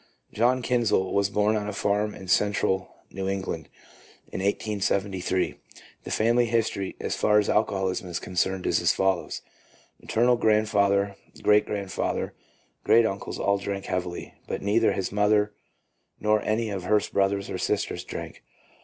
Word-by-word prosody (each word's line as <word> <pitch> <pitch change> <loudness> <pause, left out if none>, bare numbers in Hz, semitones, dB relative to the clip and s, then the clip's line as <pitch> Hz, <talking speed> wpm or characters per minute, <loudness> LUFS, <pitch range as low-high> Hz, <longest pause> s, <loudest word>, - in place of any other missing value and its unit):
John 125 +3 +2
Kinsel 120 -6 +2
1 - - -5
was 100 0 +2
born 105 +2 +2
on 105 -1 -2
a 105 - -3
farm 105 +1 0
in 95 - -10
Central 95 -1 +1 0.2
New 95 0 -3
England 95 -4 -4 0.6
in - - -4
1873. 100 -2 -1 0.5
The - - -6
family 120 +2 +2
history 110 -4 -1
as - - -2
far 105 0 +3
as 105 - +3
alco 105 +1 +3
holism 95 -1 -2
is 85 -1 -3
concerned 90 +1 -1
is - - +2
as - - +3
follows: 95 -2 -1 0.3
— - - -32
Maternal 120 +2 +2
grand 110 -1 +3
father, 100 -1 +2 0.3
great 105 0 +4
grandfather, 100 -3 -2
and - - -37
great 115 0 +5
uncles 100 -3 -3
all 100 0 +1
drank 100 0 -4
heavily, 90 -1 -4
but - - -4
neither 110 +3 +3
his 95 - -2
mother 105 0 +2 0.7
nor 105 0 +2
any 110 0 -1
of 95 -3 -4
her 105 +2 +4
brothers 100 0 +1
or - - -3
sisters - - -1
drank. - - -7
100 Hz, 160 wpm, -26 LUFS, 95-110 Hz, 0.7 s, great